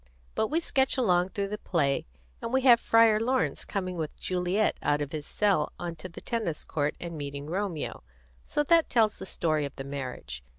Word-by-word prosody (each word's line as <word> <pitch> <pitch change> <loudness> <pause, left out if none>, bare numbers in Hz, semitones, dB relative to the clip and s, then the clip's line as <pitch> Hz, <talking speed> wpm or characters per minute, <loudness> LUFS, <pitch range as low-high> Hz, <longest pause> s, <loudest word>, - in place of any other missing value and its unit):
But 220 - +1
we 315 +6 +1
sketch 270 -5 +1
along 180 -7 +3
through 200 -1 -3
the 210 +1 -4
play, 140 - 0 0.3
and 230 - -4
we 265 +1 +3
have 245 -3 +7
Friar 225 -2 +5
Laurence 255 +3 0
coming 185 -2 -3
with 155 -2 -4
Juliet 185 +3 +1
out 145 - +2
of 145 -2 -3
his 150 -2 -5
cell 195 -8 +1
onto 175 +1 -6
the 170 - -10
tennis 220 -10 -2
court 145 -1 -1
and 170 -1 -6
meeting 140 -1 -5
Romeo; 180 -1 -3 0.4
so 295 - 0
that 330 +2 +4
tells 220 -3 +2
the - - -6
story 155 -4 0
of 140 -1 -5
the 135 - -6
marriage. 125 - -6
180 Hz, 195 wpm, -28 LUFS, 150-225 Hz, 0.4 s, have